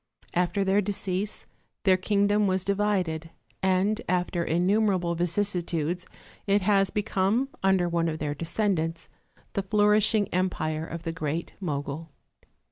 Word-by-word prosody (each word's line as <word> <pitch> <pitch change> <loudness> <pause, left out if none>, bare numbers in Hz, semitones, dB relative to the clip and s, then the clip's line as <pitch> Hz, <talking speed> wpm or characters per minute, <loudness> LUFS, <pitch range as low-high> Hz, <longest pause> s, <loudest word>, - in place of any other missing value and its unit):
After 180 +3 +1
their 195 +1 +3
decease 200 0 -2 0.4
their 190 -2 +5
Kingdom 205 +2 +2
was 185 -1 0
di 200 - +2
vided, 185 -6 -1 0.3
and 190 +4 +2
after 180 -1 0
innumerable 180 +1 +2
vicissitudes 175 -1 -1 0.4
it 200 0 +3
has 195 -1 +3
become, 210 +4 0
under 190 -2 +3
one 170 -1 0
of 160 -1 -2
their 150 -1 -2
descendants, 165 0 -1 0.4
the 200 - 0
flourishing 210 +1 +3
empire 160 -4 -1
of 170 0 -6
the 165 - -2
great 165 0 -3
Mogul. 150 -2 -4
185 Hz, 125 wpm, -27 LUFS, 170-205 Hz, 0.4 s, their